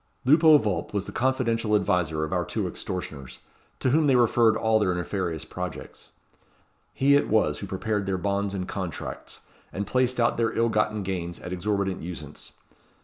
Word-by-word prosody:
Lupo 155 +3 +7
Vulp 105 -4 -2
was 100 -1 -1
the - - -7
confidential 115 -4 +1
adviser 90 -6 +1
of 80 - -3
our - - +1
two - - -2
extortioners, 70 -8 -5 0.4
to 130 - +1
whom 155 +2 +3
they 135 - +4
referred 115 -2 +4
all 110 -1 +2
their 100 -4 +1
nefarious 90 -3 -3
projects. - - -7 0.8
He 140 +1 +3
it 145 - +2
was 110 0 +2
who 100 - -6
prepared 100 +1 -2
their 95 -1 0
bonds 100 +1 -1
and 90 -1 -3
contracts, 95 -5 -6 0.3
and 100 - -3
placed 125 +3 0
out 115 0 +2
their 115 -1 0
ill 115 0 +3
gotten 105 -1 0
gains 85 -3 -4
at 90 - -6
exorbitant 95 +1 -1
usance. 80 -4 -8
100 Hz, 170 wpm, -26 LUFS, 90-115 Hz, 0.8 s, Lupo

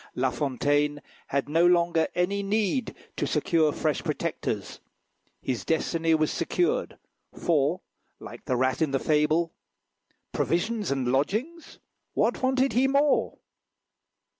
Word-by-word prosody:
La 130 0 +1
Fontaine 145 +1 0 0.3
had 140 0 -1
no 165 +3 +2
longer 170 -2 +3
any 195 +3 0
need 215 +4 -1 0.2
to - - -1
secure 165 -5 +2
fresh - - -1
protectors. - - -3 0.6
His 120 -6 -2
destiny 165 +2 +1
was 155 -1 +1
secured, 460 +8 -1 0.4
for, 160 +1 +1 0.4
like - - -11
the 130 - 0
rat 130 +3 0
in 160 - +2
the 135 0 0
fable, 155 +3 +1 0.8
"Provisions 210 +4 -1
and 130 -3 0
lodgings! 220 - -2 0.4
what - - +1
wanted 260 +1 +2
he 255 +3 +3
more?" 280 +2 +2
165 Hz, 120 wpm, -26 LUFS, 145-215 Hz, 0.8 s, longer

